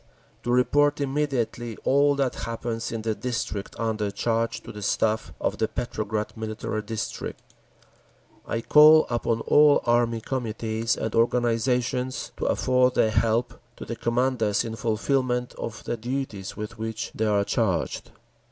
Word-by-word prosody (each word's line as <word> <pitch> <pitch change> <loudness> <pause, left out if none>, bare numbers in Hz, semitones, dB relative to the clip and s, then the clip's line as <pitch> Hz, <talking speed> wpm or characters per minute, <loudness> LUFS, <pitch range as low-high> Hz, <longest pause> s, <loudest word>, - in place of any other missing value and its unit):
To 120 - -2
report 145 +4 +3
immediately 135 -5 -1
all 140 +1 +4
that 135 -2 0 0.2
happens 115 0 -3
in 115 -1 -4
the 110 -1 0
district 110 -4 -4
under 110 -2 -1
charge 115 +2 -1
to - - -8
the 105 - -9
Staff 110 -2 0
of - - -2
the 110 - +2
Petrograd 110 -3 -3
Military 110 -1 -4
District. 105 0 -5 1.1
I 115 - -2
call 155 +4 +7
upon 115 -1 0
all 150 +3 +5
Army 120 -1 +2
Committees 115 -2 -2
and 110 - -3
organisations 125 +2 +1
to - - -3
afford 125 0 +2
their 110 - +3
help 115 +2 +1 0.2
to - - -8
the 115 - -4
commanders 115 -2 +1
in 115 -1 -4
fulfilment 125 +1 0
of 115 - -6
the 120 - -3
duties 120 -5 -4
with 105 +1 -6
which 110 0 -4
they 110 - 0
are 100 -1 +2
charged. 100 -7 -1
115 Hz, 145 wpm, -25 LUFS, 110-125 Hz, 1.1 s, call